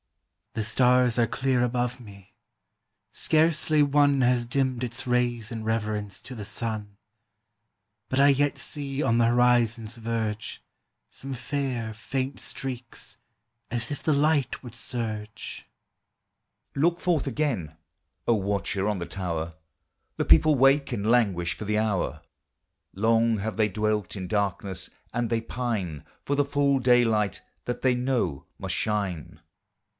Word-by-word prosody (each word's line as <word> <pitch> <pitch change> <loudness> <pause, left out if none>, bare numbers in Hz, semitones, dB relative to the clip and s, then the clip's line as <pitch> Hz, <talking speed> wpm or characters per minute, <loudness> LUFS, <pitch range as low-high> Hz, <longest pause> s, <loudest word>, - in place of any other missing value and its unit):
"The 110 - -1
stars 125 +2 +3
are 120 -1 +3
clear 130 -1 +1
above 125 +1 -1
me; 100 -2 -14 0.8
scarcely 155 -1 +3
one 145 -1 +4
Has 125 -1 +3
dimmed 130 0 0
its 125 +1 -3
rays 120 -2 +1
in 115 -1 -4
reverence 105 -3 -2
to 130 - -9
the 110 - -6
sun; 105 -2 -4 1.1
But 130 - 0
I 140 +1 +7
yet 145 +1 +2
see 140 -1 -3
on 115 -5 +2
the 115 - +4
horizon's 120 -1 +2
verge 110 -2 -3 0.5
Some 135 0 -6
fair, 130 -3 -3
faint 130 +4 -3
streaks, 130 -3 -4 0.5
as 120 +1 -2
if 145 - -4
the 155 - +2
light 145 -2 +2
would 120 -4 -10
surge." 110 -3 -4 1.1
Look 170 +5 +2
forth 165 -6 +1
again, 115 - -2 0.5
O 120 - +5
watcher 100 -1 -1
on 105 - 0
the 85 - -3
tower, 85 -4 -3 0.6
The - - 0
people 155 -1 +6
wake 135 +2 +4
and 100 +2 -1
languish 100 -8 +2
for - - -8
the 105 +1 0
hour; 105 -4 -1 0.7
Long 115 +2 +3
have 110 +2 -3
they 110 -1 +2
dwelt 105 +1 -1
in 95 -1 -4
darkness, 100 -1 -2 0.2
and 120 -1 -1
they 115 -1 +1
pine 110 - -3 0.2
For 140 - 0
the 145 - +3
full 140 -1 +2
daylight 115 -5 +3 0.2
that 125 - -4
they 130 -1 +4
know 125 - -1
must - - -2
shine. 100 -7 -2
120 Hz, 140 wpm, -26 LUFS, 105-130 Hz, 1.1 s, I